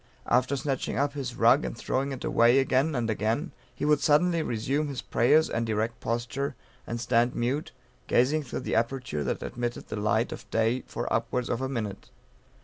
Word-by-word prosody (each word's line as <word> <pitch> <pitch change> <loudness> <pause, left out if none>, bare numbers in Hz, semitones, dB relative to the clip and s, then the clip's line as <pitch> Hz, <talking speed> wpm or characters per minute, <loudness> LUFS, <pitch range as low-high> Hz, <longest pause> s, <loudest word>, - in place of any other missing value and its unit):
After 125 +3 +2
snatching 135 0 -2
up 140 0 +1
his 130 -4 -4
rug 120 +6 +5
and - - -4
throwing 135 +3 -1
it 130 - -6
away 120 +2 +4
again 135 +3 +2
and 120 -2 0
again, 110 - -1 0.2
he - - -3
would 150 -1 +4
suddenly 165 +3 +3
resume 135 +4 -1
his 140 -3 -5
prayers 155 +7 +3
and 115 0 -2
erect 110 +2 -1
posture, 125 +5 -2 0.3
and 120 - -3
stand 120 +1 +2
mute, 130 +6 -1 0.4
gazing 140 +6 +3
through 135 - -5
the - - -3
aperture 115 - -1
that - - -2
admitted 120 0 -4
the - - -4
light 110 +3 +1
of - - -8
day 115 +3 +1
for 120 - -4
upwards 115 +2 -1
of 120 - -1
a 130 - -1
minute. 105 -7 -4
125 Hz, 185 wpm, -28 LUFS, 115-140 Hz, 0.4 s, rug